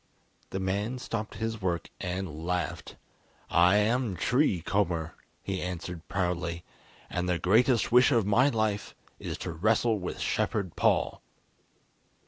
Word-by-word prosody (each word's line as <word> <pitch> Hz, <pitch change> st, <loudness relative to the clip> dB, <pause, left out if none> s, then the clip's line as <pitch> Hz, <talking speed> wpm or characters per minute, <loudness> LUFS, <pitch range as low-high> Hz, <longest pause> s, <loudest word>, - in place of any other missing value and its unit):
The 95 Hz, -, -3 dB
man 100 Hz, +6 st, -1 dB
stopped 115 Hz, -4 st, -4 dB
his 110 Hz, 0 st, -3 dB
work 85 Hz, -3 st, -2 dB
and 90 Hz, -4 st, -4 dB
laughed. 90 Hz, -3 st, -3 dB, 0.6 s
"I 90 Hz, +3 st, +5 dB
am 110 Hz, 0 st, +2 dB
Tree 120 Hz, -, +2 dB
Comber," 85 Hz, -3 st, 0 dB, 0.3 s
he 95 Hz, -2 st, -3 dB
answered 90 Hz, -1 st, -5 dB
proudly; 90 Hz, -3 st, -2 dB, 0.4 s
"and 90 Hz, 0 st, -2 dB
the 90 Hz, -, +2 dB
greatest 115 Hz, +7 st, +3 dB
wish 125 Hz, +3 st, +6 dB
of 115 Hz, -6 st, +3 dB
my 120 Hz, +7 st, +4 dB
life 110 Hz, -4 st, -1 dB, 0.2 s
is -, -, -5 dB
to -, -, -3 dB
wrestle 110 Hz, +6 st, +2 dB
with 90 Hz, -, -5 dB
Shepherd 100 Hz, -6 st, -1 dB
Paul." -, -, +1 dB
95 Hz, 130 wpm, -29 LUFS, 90-110 Hz, 0.6 s, wish